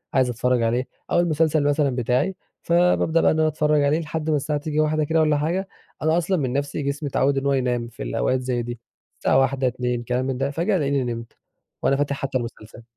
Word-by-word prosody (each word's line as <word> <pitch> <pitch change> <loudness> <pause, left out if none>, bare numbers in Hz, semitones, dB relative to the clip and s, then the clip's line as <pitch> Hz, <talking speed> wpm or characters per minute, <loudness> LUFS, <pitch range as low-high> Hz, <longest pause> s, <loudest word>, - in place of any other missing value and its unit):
عايز 130 -2 +3
أتفرّج 125 +1 +1
عليه 120 +3 0 0.2
أو - - +3
المسلسل 160 -2 +2
مثلًا 145 -2 +1
بتاعي، 125 +9 0 0.3
فبابدأ 170 -1 +3
بقى - - +4
إن 160 - 0
أنا 155 - +3
أتفرّج 150 -1 +2
عليه 145 +3 +2
لحد 160 0 -4
ما 155 - +3
الساعة 145 +1 -1
تيجي 155 0 -2
01:00 155 0 +2
كده 160 +2 +1
والّا 155 -1 +3
حاجة. 175 +6 -1 0.3
أنا 160 +2 +2
أصلًا 175 +2 +1
من 130 -4 -1
نَفسي 140 +1 -2
جسمي 140 +1 -2
اتعوّد 135 +1 +1
إنّ 135 - -1
هو 140 - +2
ينام 125 -3 0
في 115 - -8
الأوقات 95 - 0
زي 125 -1 -1
دي، 120 0 -6 0.4
الساعة 130 - +3
01:00 135 0 +1
02:00 125 -1 -2
كلام 125 +2 -1
من 130 -1 -2
ده، 135 +1 -1
فجأة 175 +7 0
ألاقيني 140 -4 0
نمت، 115 -1 -5 0.5
وأنا 135 - +2
فاتح 145 0 0
حتّى 135 -1 -2
المسلسل. 115 -1 -8
140 Hz, 215 wpm, -23 LUFS, 125-155 Hz, 0.5 s, بقى